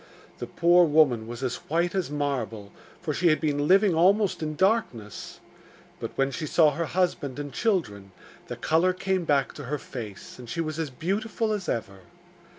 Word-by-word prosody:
The - - -5
poor 175 +1 +4
woman 140 -8 +3
was 120 +2 -7
as 125 -2 -1
white 170 +2 +1
as 190 -5 -1
marble, 135 -8 -3 0.3
for 155 -4 -1
she 175 +4 +1
had 155 -2 +4
been 145 -2 0
living 195 +1 +5
almost 190 +4 +3
in 155 -1 -3
darkness; 185 - -1 0.6
but - - -4
when 135 0 +1
she 150 +4 -4
saw 155 0 +4
her 165 +4 -2
husband 160 -6 -1
and 145 -1 -6
children, 110 - -1 0.4
the - - -5
colour 170 +4 +2
came 185 -1 -1
back 140 -3 +1
to 145 - -8
her 150 +4 -2
face, 115 -6 -9
and 120 -2 -10
she 165 - -4
was 155 -1 -2
as 160 -3 -2
beautiful 210 - -2
as 195 -5 -4
ever. 100 -4 -3
155 Hz, 180 wpm, -26 LUFS, 135-180 Hz, 0.6 s, living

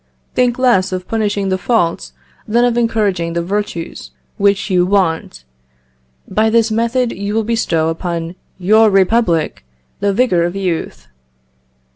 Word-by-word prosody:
Think 245 -1 +1
lees 235 -7 +2
of 185 0 -4
punishing 205 -3 -1
the 185 0 0
faults 180 -4 0 0.3
than 235 +3 +3
of 240 -1 +1
encouraging 205 -8 0
the 170 0 -1
virtues 190 - -4 0.3
which 200 0 +2
you 180 -1 +3
want. 170 - 0 0.8
By 215 +3 +1
this 225 0 +2
method 235 +2 0
you 200 +2 -4
will 225 - +1
bestow 205 -8 0
upon 165 0 -4 0.2
your 215 +4 +4
republic 190 - +1 0.4
the 200 - +1
vigour 195 -5 +2
of 175 +2 -1
youth. 165 - -3
200 Hz, 135 wpm, -16 LUFS, 175-225 Hz, 0.8 s, your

